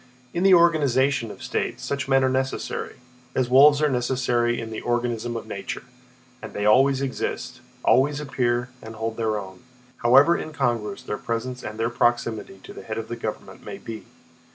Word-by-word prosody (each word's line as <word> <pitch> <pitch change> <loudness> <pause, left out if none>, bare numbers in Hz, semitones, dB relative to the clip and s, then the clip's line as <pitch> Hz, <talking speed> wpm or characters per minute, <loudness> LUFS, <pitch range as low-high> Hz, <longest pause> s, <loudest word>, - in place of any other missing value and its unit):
In 175 - -1
the 190 -1 +7
organism 140 -7 +3
of - - -10
states - - -3
such 140 -1 -2
men 135 0 +4
are - - +4
necessary, 130 +1 -2 0.4
as 125 -1 0
wolves 145 +3 +7
are - - +5
necessary 125 -2 0
in 115 -1 -6
the 110 - -5
organism 120 -1 -1
of - - -7
nature, - - -6 0.6
and - - -8
they 105 - -2
always 135 +5 +4
exist, 130 -3 -4 0.2
always 145 +3 +4
appear 125 -3 -1
and 110 0 -9
hold 110 0 -3
their 110 -2 0
own, 95 -2 -8 0.4
however 135 +8 +5
incongruous 120 -8 -2
their 105 - -4
presence 125 +2 -3
and 110 +1 -7
their 115 +1 0
proximity 115 -4 0
to - - -10
the - - -9
head 110 +3 -6
of 115 - -5
the 120 - -3
government 110 -2 -6
may - - -7
be. 110 -1 -8
120 Hz, 175 wpm, -24 LUFS, 115-135 Hz, 0.6 s, the